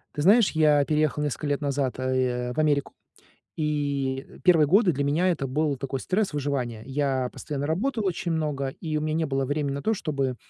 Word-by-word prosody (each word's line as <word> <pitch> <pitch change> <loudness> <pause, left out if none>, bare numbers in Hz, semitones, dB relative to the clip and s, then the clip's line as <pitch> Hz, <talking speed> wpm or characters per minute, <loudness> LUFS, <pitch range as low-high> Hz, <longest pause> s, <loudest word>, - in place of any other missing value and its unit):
Ты 145 - -2
знаешь, 210 +3 +5
я 150 -2 +4
переехал 150 -1 +1
несколько 150 +1 -2
лет 145 +1 -1
назад, 140 -2 -1
э, - - -3
а, 130 -1 0
э, - - -4
в - - -15
Америку, 145 -3 +1 0.6
и 140 -3 -1 0.2
первые 165 -5 +5
годы 195 +2 +4
для 145 - -1
меня 150 +6 +1
это 150 -6 -1
был 145 +2 0
такой 135 +1 -4
стресс 195 +5 0
выживания. 135 -6 -2
Я 135 -2 0
постоянно 145 -1 -4
работал 215 - -1
очень 175 -1 -2
много, 150 -4 -1
и 155 +3 -4
у - - 0
меня 155 0 -1
не 160 0 0
было 135 -1 -1
времени 145 +1 -1
на 140 - -4
то, 220 - +1
чтобы, 140 - -2
145 Hz, 205 wpm, -26 LUFS, 135-155 Hz, 0.6 s, знаешь